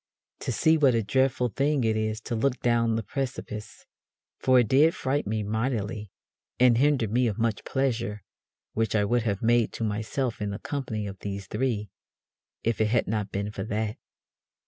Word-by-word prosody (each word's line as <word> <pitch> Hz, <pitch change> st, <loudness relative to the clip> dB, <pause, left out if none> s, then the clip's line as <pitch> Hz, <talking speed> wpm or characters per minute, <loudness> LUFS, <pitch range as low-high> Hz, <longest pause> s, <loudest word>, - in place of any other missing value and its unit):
to -, -, -3 dB
see 160 Hz, 0 st, +3 dB
what 135 Hz, -5 st, +5 dB
a 115 Hz, -, +1 dB
dreadfull 125 Hz, +2 st, +1 dB
thing 140 Hz, -1 st, +2 dB
it 110 Hz, -1 st, +2 dB
is 110 Hz, 0 st, -1 dB
to 120 Hz, -, -6 dB
look 125 Hz, +3 st, +1 dB
down 115 Hz, -1 st, +2 dB
the 115 Hz, -, -1 dB
precipices, 125 Hz, -5 st, -5 dB, 0.5 s
for 130 Hz, -1 st, +4 dB
it 120 Hz, -, -1 dB
did 150 Hz, +8 st, +5 dB
fright 135 Hz, -2 st, -1 dB
me 110 Hz, 0 st, -1 dB
mightily, 110 Hz, -1 st, -2 dB, 0.5 s
and 120 Hz, -2 st, +5 dB
hinder 140 Hz, -4 st, +3 dB
me 120 Hz, +4 st, +2 dB
of 105 Hz, -2 st, -2 dB
much 115 Hz, -2 st, 0 dB
pleasure 115 Hz, -6 st, -1 dB, 0.5 s
which 110 Hz, 0 st, 0 dB
I 105 Hz, -1 st, +3 dB
would 120 Hz, +4 st, +2 dB
have 105 Hz, -2 st, -2 dB
made 120 Hz, 0 st, +3 dB
to -, -, -4 dB
myself 110 Hz, +3 st, -2 dB
in 105 Hz, -, -1 dB
the 100 Hz, -, -4 dB
company 125 Hz, -8 st, -4 dB
of 100 Hz, -1 st, -7 dB
these 100 Hz, -1 st, -5 dB
three, 105 Hz, -2 st, -2 dB, 0.7 s
if 115 Hz, -1 st, 0 dB
it 110 Hz, -, +3 dB
had 120 Hz, +3 st, +2 dB
not 105 Hz, -1 st, -1 dB
been 100 Hz, +1 st, -2 dB
for 95 Hz, -, -5 dB
that. 110 Hz, -1 st, -2 dB
115 Hz, 185 wpm, -27 LUFS, 105-125 Hz, 0.7 s, what